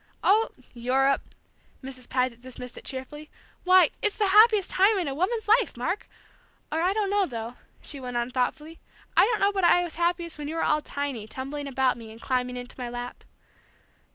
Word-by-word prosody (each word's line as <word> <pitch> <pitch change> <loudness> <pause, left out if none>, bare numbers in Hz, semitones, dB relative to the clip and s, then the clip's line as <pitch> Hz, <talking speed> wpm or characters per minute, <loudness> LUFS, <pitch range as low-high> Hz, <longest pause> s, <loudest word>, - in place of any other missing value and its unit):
"Oh, 435 +3 +4 0.2
Europe!" 260 +3 +2 0.6
Mrs. 255 -2 -9
Paget 250 -2 -1
dismissed 250 -1 -9
it - - -11
cheerfully. 295 +3 -6 0.4
"Why, 365 -3 +6
it's 420 - +1
the 415 -3 +2
happiest 425 -1 +6
time 400 +3 +4
in 355 -5 -1
a 275 - -2
woman's 425 - -1
life, 445 - +3
Mark! 345 +11 -3 0.6
Or 320 +2 0
I 360 +2 +2
don't 405 -1 0
know, 405 -2 +2
though," 230 -1 -6 0.3
she 285 - -6
went 250 -2 -4
on 240 +1 -1
thoughtfully, 300 +6 -2 0.4
"I - - +7
don't 450 0 0
know 400 - +4
but 400 - -8
what - - +3
I 355 +1 +5
was 340 -2 -7
happiest 345 -2 -1
when 295 - -4
you 315 - -4
were 330 - 0
all 305 0 +2
tiny, 280 -8 -4
tumbling 275 +4 -5
about 265 -2 +1
me, 225 -2 -10
and 225 - -12
climbing 250 0 -1
into 245 +1 -9
my 245 -1 -4
lap.... 245 0 -7
290 Hz, 200 wpm, -26 LUFS, 250-370 Hz, 0.6 s, I